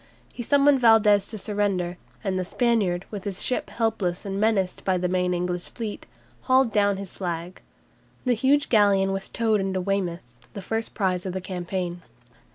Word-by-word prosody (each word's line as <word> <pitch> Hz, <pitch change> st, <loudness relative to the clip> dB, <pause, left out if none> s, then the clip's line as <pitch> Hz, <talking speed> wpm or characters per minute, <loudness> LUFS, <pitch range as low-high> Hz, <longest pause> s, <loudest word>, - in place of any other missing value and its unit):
He -, -, -6 dB
summoned 280 Hz, +2 st, +4 dB
Valdes 215 Hz, -3 st, +5 dB
to 220 Hz, -, -6 dB
surrender, 195 Hz, -4 st, -1 dB, 0.2 s
and 190 Hz, -2 st, -1 dB
the -, -, -1 dB
Spaniard, 195 Hz, -4 st, 0 dB
with 205 Hz, -3 st, -6 dB
his 195 Hz, -2 st, -2 dB
ship 250 Hz, -, -1 dB
helpless 210 Hz, -6 st, -1 dB
and 195 Hz, 0 st, -3 dB
menaced 205 Hz, -4 st, +1 dB
by 185 Hz, -1 st, +1 dB
the 180 Hz, 0 st, 0 dB
main 180 Hz, 0 st, 0 dB
English 180 Hz, 0 st, -2 dB
fleet, 220 Hz, -3 st, -6 dB, 0.4 s
hauled 260 Hz, -2 st, +4 dB
down 205 Hz, -2 st, +2 dB
his 195 Hz, -2 st, -7 dB
flag. 175 Hz, -1 st, -5 dB, 0.6 s
The 250 Hz, -, +3 dB
huge 275 Hz, +5 st, +2 dB
galleon 200 Hz, -3 st, +4 dB
was 195 Hz, 0 st, -4 dB
towed 220 Hz, -3 st, +1 dB
into 190 Hz, -1 st, -1 dB
Weymouth, 185 Hz, -2 st, -2 dB, 0.3 s
the 200 Hz, -, -5 dB
first 225 Hz, +3 st, -3 dB
prize 185 Hz, -2 st, 0 dB
of 185 Hz, -, -4 dB
the 190 Hz, -, -2 dB
campaign. 180 Hz, -1 st, -4 dB
195 Hz, 170 wpm, -25 LUFS, 180-225 Hz, 0.6 s, Valdes